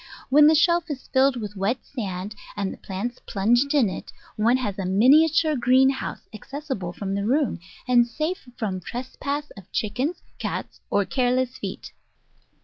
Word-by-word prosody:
When 295 +2 +7
the 315 - +6
shelf 340 +1 +3
is 275 -3 -6
filled 265 0 +3
with 210 -4 -5
wet 200 +6 -1
sand, 200 -5 -5 0.2
and 195 -1 -2
the - - -11
plants 215 +6 -5
plunged 240 +8 +2
in 265 -7 +5
it, 185 - -6 0.2
one 230 +4 +3
has 205 -6 -3
a 190 - -2
miniature 300 - +5
greenhouse 260 +2 +2
acces 285 +8 -8
sible 175 -3 -6
from 195 -1 -3
the 200 0 -1
room, 260 -1 +1 0.3
and 240 -1 +5
safe 305 +3 -3
from 195 -5 -2
trespass 280 +7 -5
of 195 -3 -14
chickens, 250 - -2 0.2
cats, - - -4
or 205 - +2
careless 255 +1 0
feet. - - -6
250 Hz, 160 wpm, -24 LUFS, 205-280 Hz, 0.3 s, When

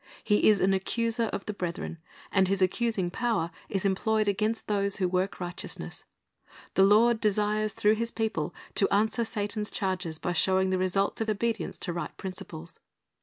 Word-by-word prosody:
He 210 0 +4
is 210 -2 +4
an 195 +1 +3
accuser 230 +4 0
of 200 - -4
the 210 - -3
brethren, 170 -3 -4 0.3
and 190 -2 +3
his 195 +1 +1
accusing 190 -1 +1
power 210 -7 0 0.2
is 195 0 -1
employed 215 +2 +1
against 215 +3 0
those 200 -1 0
who 185 -3 +1
work 185 +2 -1
righteousness. 175 -1 -6 0.7
The - - +3
Lord 220 +4 +5
desires 210 0 +1
through 210 -1 +3
His 230 +1 0
people 220 -10 -2 0.2
to 195 - +3
answer 220 +4 +2
Satan's 210 -1 -2
charges 180 -5 -2
by 175 - -2
showing 190 +2 +3
the 185 - +1
results 195 +3 0
of 220 - -1
obedience 220 -3 -1
to 175 - -4
right 170 - -5
principles. 175 -3 -7
200 Hz, 170 wpm, -28 LUFS, 185-215 Hz, 0.7 s, Lord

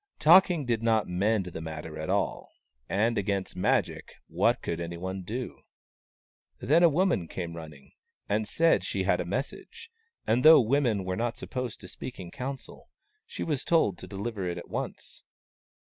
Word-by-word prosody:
Talking 170 0 +5
did 115 -2 0
not 115 -2 +2
mend 100 +3 +1
the 85 -2 -7
matter 80 -1 -7
at 80 - -4
all, - - -1 0.4
and 110 +3 +1
against 100 -2 -2
Magic, 90 - 0
what - - +1
could 85 - -3
anyone 85 +3 -5
do? 120 +7 -6 1.0
Then 145 +8 +3
a 170 - +7
woman 165 - +1
came 85 -1 -5
running, 75 -4 -11 0.4
and 105 +1 0
said 165 0 +3
she - - -2
had - - +2
a - - -4
message, - - -5 0.3
and 120 +3 +2
though 155 +1 +9
women 120 -4 +1
were 90 0 -2
not 120 +4 -2
supposed 125 -3 -5
to - - -10
speak 125 - -8
in 90 -2 -8
council, 135 0 -7 0.4
she - - -5
was 150 -5 -2
told 130 - +2
to - - -9
deliver 100 -1 -4
it 85 - -4
at - - -9
once. - - -6
110 Hz, 165 wpm, -28 LUFS, 90-130 Hz, 1.0 s, though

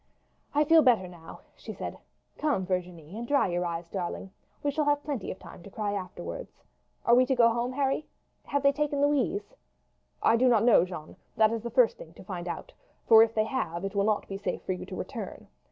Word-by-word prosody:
"I 295 - +5
feel 320 +2 +6
better 235 -9 +4
now," 170 -2 -12
she - - -8
said. - - -6 0.4
"Come, 285 -12 +1
Virginie, 180 -2 -4
and 235 +2 -5
dry 280 -7 +3
your 175 0 -1
eyes, 170 0 -4
darling; 190 +1 -4 0.3
we 290 - +1
shall 300 +1 0
have 290 0 +2
plenty 280 -9 -4
of - - -5
time - - -12
to 200 - -11
cry 205 0 -3
afterwards. 190 - -7 0.4
Are 235 - +5
we 250 +1 +7
to 265 - +2
go 230 -2 +5
home, 240 +2 -1
Harry? 275 +2 0 0.4
Have 285 -1 -1
they 280 - +6
taken 290 0 -1
Louise?" 290 - +1 0.7
"I 230 - +5
do 255 +2 +4
not 230 -4 +4
know, 235 -6 +6
Jeanne; 175 -4 -9 0.2
that 220 0 +5
is 230 -1 -2
the 235 - -4
first - - +3
thing - - -11
to - - -12
find - - -6
out, - - -6 0.3
for 225 -1 +9
if 225 0 +3
they 215 -1 +2
have, 195 -8 -3
it 195 - -4
will 200 -1 +1
not 215 -1 0
be 195 - -5
safe 190 -3 -3
for - - -3
you 180 - -7
to - - -7
return. - - -6
225 Hz, 220 wpm, -28 LUFS, 185-280 Hz, 0.7 s, for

